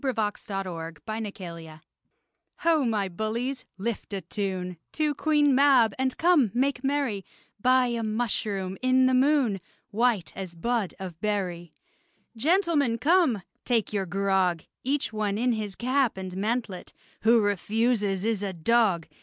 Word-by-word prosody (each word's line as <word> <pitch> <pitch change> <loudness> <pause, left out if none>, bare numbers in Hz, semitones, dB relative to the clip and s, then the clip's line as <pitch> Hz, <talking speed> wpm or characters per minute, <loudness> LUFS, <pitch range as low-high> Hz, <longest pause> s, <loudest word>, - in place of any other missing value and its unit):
AN 260 -3 0
ELF 210 -1 0
SWASHBUCKLER 175 -2 -6 0.8
Ho, 330 -4 +3
my 215 -5 0
bullies, 230 +8 -3
lift 210 +1 -4
a 195 - -3
tune 185 -1 -4 0.2
To 305 -1 +1
Queen 295 -1 +3
Mab, 265 -4 +5
and, 260 -1 0
come, 330 -9 +4
make 265 0 +1
merry, 270 -8 0 0.4
By 255 +1 +4
a 235 -1 -1
mushroom 215 -4 -2
in 255 0 +4
the 260 - +3
moon, 255 -7 +3 0.3
White 220 -4 +1
as 185 -3 -7
bud 225 +2 -1
of 185 -3 -8
berry! 180 -6 -2 0.6
Gentlemen, 300 - +2
come! 290 - +3 0.2
take 230 -4 0
your 195 -2 -1
grog! 190 -2 +1 0.2
Each 275 -3 -1
one 210 -2 -1
in 245 +2 +2
his 210 -4 -3
cap 255 -2 +1
and 185 -1 -6
mantlet: 210 -2 -3 0.3
Who 230 +1 +5
refuses 205 0 0
is 225 -3 0
a 200 -2 -3
dog! 185 -1 +2
220 Hz, 135 wpm, -27 LUFS, 190-255 Hz, 0.8 s, Mab